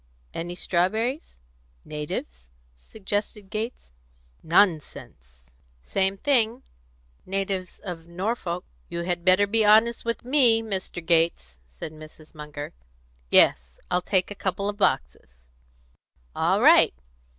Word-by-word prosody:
"Any 175 +1 -5
strawberries? 220 - -1 0.5
natives?" 60 - -6 0.3
suggested 205 - -5
Gates. 220 - -5 0.5
"Nonsense!" 155 - 0 0.4
"Same 195 - 0
thing; 245 -1 +1 0.6
natives 190 -1 -3
of 170 -4 -8
Norfolk." 180 -1 -3 0.2
"You 170 - -3
had 175 -1 -2
better 185 +2 +5
be 220 +2 +2
honest 220 +3 +4
with 230 0 -3
me, 245 -4 +4
Mr. 190 -5 -4
Gates," 165 - +1
said 60 - -9
Mrs. 155 0 -14
Munger. 150 -1 -8 0.6
"Yes, 60 0 +4
I'll 180 0 +2
take 185 0 0
a 205 - -9
couple 195 +1 -2
of 205 0 -3
boxes." 60 - -1 0.9
"All - - +2
right! - - +6
185 Hz, 110 wpm, -25 LUFS, 155-210 Hz, 0.9 s, right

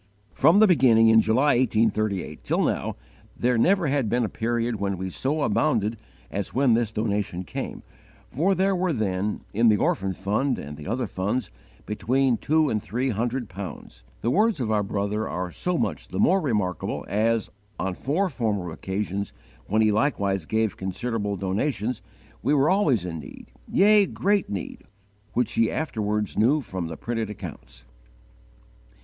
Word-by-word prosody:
From 170 - +5
the 215 - +7
beginning 120 - +5
in 110 0 +7
July, 125 +6 +3
1838, 110 -5 0
till - - +1
now, - - -1 0.4
there 125 +1 +2
never 185 - +3
had 135 -5 +1
been 120 +1 +1
a - - -3
period 115 -1 -1
when 100 -1 -1
we 95 +1 -4
so 145 - -1
abounded 115 -8 +1 0.4
as 100 0 -4
when 130 -2 +4
this 115 -1 +1
donation 105 -4 -2
came; - - -6 0.4
for 185 +8 +1
there 190 +1 +2
were 180 -2 0
then, 105 -3 -1
in 115 +3 +4
the 105 - +4
orphan 95 0 0
fund 105 +9 0
and 75 +1 -7
the 75 0 -10
other 120 +4 -1
funds, 100 - -2 0.3
between 125 +5 +1
two 155 +4 +2
and 110 -6 0
three 125 +9 -1
hundred 120 +3 -2
pounds! 90 -10 -9 0.2
The 120 - +1
words 215 - +2
of 115 -4 -1
our 105 -1 +2
brother 105 +1 -2
are 90 0 -3
so 180 - -1
much - - -2
the - - -6
more 190 +2 +4
remarkable 105 - -1
as, 110 +2 0 0.3
on 95 - -2
four 155 - 0
former 105 - -2
occasions, 100 +3 -3 0.3
when 110 +2 +2
he 110 - +4
likewise 100 - 0
gave 110 -1 0
considerable 105 +2 -2
donations, 105 +5 -2 0.4
we 145 +5 +2
were 145 +4 +3
always 145 - +2
in 85 -2 -4
need, 70 - -11 0.2
yea, 205 0 +5
great 200 +1 0
need, 100 -3 -5 0.5
which 125 - +1
he 115 -1 +2
afterwards 105 -8 -2
knew 135 +8 +4
from 95 -8 -5
the 80 -1 -7
printed 115 -2 -3
accounts." 105 - -9
110 Hz, 165 wpm, -25 LUFS, 100-135 Hz, 0.5 s, the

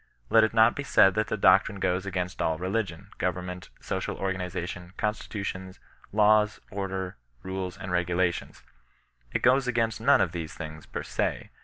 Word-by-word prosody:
Let 110 - +7
it 110 - +2
not 110 +1 +6
be - - -3
said 95 -8 +5
that 110 +2 0
the 110 - -2
doctrine 95 +1 +4
goes 90 +1 0
against 90 -1 -3
aU 80 - +1
religion, 90 -1 -3
goyemment, 90 0 -3
social - - -3
organization, 90 -1 -4
constitutions, 100 -3 -4 0.3
laws, 105 0 +4
order, 95 -4 -4 0.3
rules, 95 -1 -4
and 90 - -6
regulations. 90 0 -1 0.7
It - - -2
goes 130 +1 +4
against 115 -3 0
none - - +5
of - - +2
these 80 -2 -5
things, 80 -1 -8
per - - -5
se. - - -2
95 Hz, 155 wpm, -27 LUFS, 90-105 Hz, 0.7 s, Let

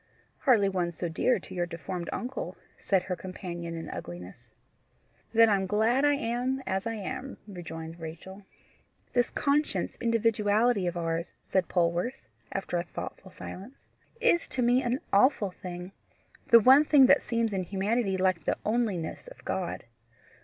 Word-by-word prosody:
"Hardly 230 -8 +4
one 180 -3 -1
so 170 +1 -4
dear 235 +9 +2
to 185 - -10
your 175 -1 -1
deformed 170 0 -5
uncle," 255 +2 -4 0.2
said 190 -2 +1
her 185 -1 -3
companion 175 -2 -6
in 165 -1 -6
ugliness. 90 +7 -8 0.8
"Then 225 0 +6
I'm 195 -3 +2
glad 220 +7 +2
I 290 0 +4
am 255 +1 -1
as 190 +3 -1
I 225 - -2
am," 255 +6 -5
rejoined 165 -3 -8
Rachel. 170 +5 -8 0.7
"This 245 -1 +2
conscious 280 - 0
individuality 225 -2 +2
of 175 0 -2
ours," 165 0 -2
said 185 -3 0
Polwarth, 175 +7 0 0.3
after 195 -2 -2
a 170 - 0
thoughtful 185 +2 -8
silence, 195 +7 -9 0.4
"is 455 -8 +3
to 255 - -2
me 245 +2 +4
an 250 +2 -1
awful 205 -2 +4
thing 180 0 -8 0.6
the 235 - +9
one 265 +6 +7
thing 290 -3 +6
that 280 +2 +6
seems 230 -2 -1
in 190 - 0
humanity 195 +2 0
like 185 -4 +1
the - - +1
onliness 215 - -1
of - - -13
God. 185 -2 -3
195 Hz, 155 wpm, -29 LUFS, 175-240 Hz, 0.8 s, the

